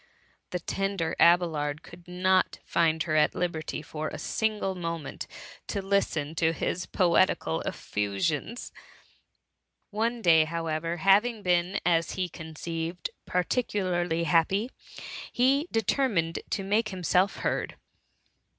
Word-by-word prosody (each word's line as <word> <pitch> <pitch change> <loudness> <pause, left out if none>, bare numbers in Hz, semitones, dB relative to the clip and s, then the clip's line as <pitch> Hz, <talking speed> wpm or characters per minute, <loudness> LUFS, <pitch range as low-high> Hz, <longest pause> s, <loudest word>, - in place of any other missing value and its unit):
The 180 - -2
tender 195 -2 -2
Abelard 160 -4 +3
could 175 0 -14
not 185 +1 +2
find 160 -1 +2
her 155 -2 -1
at 150 - +4
THE - - -10
MUMMY* - - 0
163 160 -2 -5
liberty - - -5
for 155 0 -4
a - - -7
single 215 -3 -1
momenty 165 -4 -5 0.4
to - - -2
listen 190 -6 0
to 165 0 +2
his 180 +2 -2
poetical 170 - +2
effiifflons. 135 - -2 1.2
One 230 +2 -1
day, 160 -3 +6
however^ 165 0 -2
having 205 +5 +3
been^ 180 +1 +2
as 170 -1 +2
he 185 -1 -2
conceived, 165 +2 -5 0.2
particularly 180 -4 0
happy, 175 - +2 0.6
he 275 +6 +3
determined 215 - +1
to 195 - -1
make 215 +3 +1
himself 185 +1 +1
heard. - - -1
175 Hz, 125 wpm, -28 LUFS, 160-195 Hz, 1.2 s, day